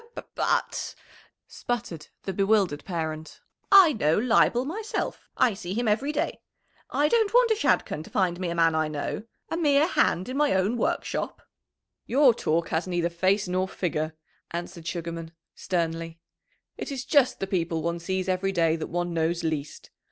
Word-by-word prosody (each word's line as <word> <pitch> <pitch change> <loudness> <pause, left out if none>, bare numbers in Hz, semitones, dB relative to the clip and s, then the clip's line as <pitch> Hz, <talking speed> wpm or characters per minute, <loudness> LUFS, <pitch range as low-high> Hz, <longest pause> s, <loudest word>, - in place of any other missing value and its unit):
"B 465 - -20
b - - -5
b - - -4
ut," - - 0 0.5
sputtered 205 -10 -5 0.2
the 195 - -3
bewildered 195 -6 +2
parent, 160 -3 -5 0.3
"I 380 -6 +8
know 155 -7 +2
Leibel 240 +2 +3
myself. 420 +9 -4
I 235 - +4
see 190 -1 -6
him 240 0 0
every 235 +8 +1
day. 300 - -2 0.5
I 295 - +2
don't 440 +3 +2
want - - +5
a - - +4
Shadchan 415 - +1
to - - -11
find 185 -3 0
me 180 -2 -2
a 170 - -3
man 165 -1 +4
I 155 0 +1
know 155 +8 -4 0.2
a 325 - -2
mere 295 -3 +4
hand 185 - +1
in 255 +2 -4
my 295 -7 +3
own 190 +5 +1
workshop!" 240 - -2 0.6
"Your 265 -1 +5
talk 165 -4 0
has 160 +3 -1
neither 175 -1 0
face 190 +4 +1
nor 185 +1 0
figure," 160 -4 -2 0.3
answered 170 -1 -6
Sugarman 165 -1 -5 0.2
sternly. 165 -2 -2 0.6
"It - - -5
is 270 -1 -4
just 280 -4 +3
the - - -1
people 170 -4 -1
one 170 +1 -1
sees 185 +2 -2
every 190 +1 0
day 165 -3 +2
that 160 - -4
one 175 0 -2
knows 165 +1 0
least. 155 -3 -4
185 Hz, 175 wpm, -26 LUFS, 165-240 Hz, 0.6 s, I